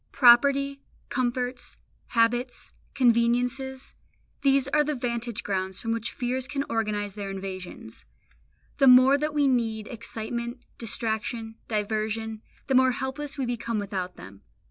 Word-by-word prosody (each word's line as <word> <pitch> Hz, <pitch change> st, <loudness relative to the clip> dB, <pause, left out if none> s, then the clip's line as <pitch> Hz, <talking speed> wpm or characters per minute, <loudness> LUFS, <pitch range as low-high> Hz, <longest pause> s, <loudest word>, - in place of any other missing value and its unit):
Property, 275 Hz, +3 st, +5 dB, 0.3 s
comforts, 250 Hz, 0 st, -2 dB, 0.3 s
habits, 240 Hz, +2 st, 0 dB, 0.2 s
conveniences, 245 Hz, +2 st, +1 dB, 0.5 s
these 275 Hz, -1 st, +3 dB
are 300 Hz, -, +3 dB
the 300 Hz, 0 st, -1 dB
vantage 235 Hz, -2 st, -3 dB
grounds 190 Hz, -1 st, -2 dB
from 225 Hz, -, -3 dB
which 230 Hz, 0 st, -2 dB
fears 255 Hz, +1 st, -2 dB
can 280 Hz, -1 st, -2 dB
organise 210 Hz, -3 st, -1 dB
their 200 Hz, -1 st, -5 dB
invasions. 190 Hz, -1 st, -7 dB, 0.7 s
The 275 Hz, -, +6 dB
more 255 Hz, +2 st, +8 dB
that 300 Hz, 0 st, -2 dB
we 290 Hz, -1 st, +4 dB
need 225 Hz, -4 st, 0 dB
excitement, 235 Hz, +1 st, -5 dB
distraction, 225 Hz, 0 st, -2 dB
diversion, 215 Hz, +1 st, -2 dB, 0.2 s
the 270 Hz, -, -1 dB
more 260 Hz, 0 st, +5 dB
helpless 275 Hz, +3 st, -4 dB
we 270 Hz, -, -1 dB
become 235 Hz, -1 st, -2 dB
without 190 Hz, -3 st, -3 dB
them. 95 Hz, +2 st, -12 dB
240 Hz, 125 wpm, -27 LUFS, 220-260 Hz, 0.7 s, more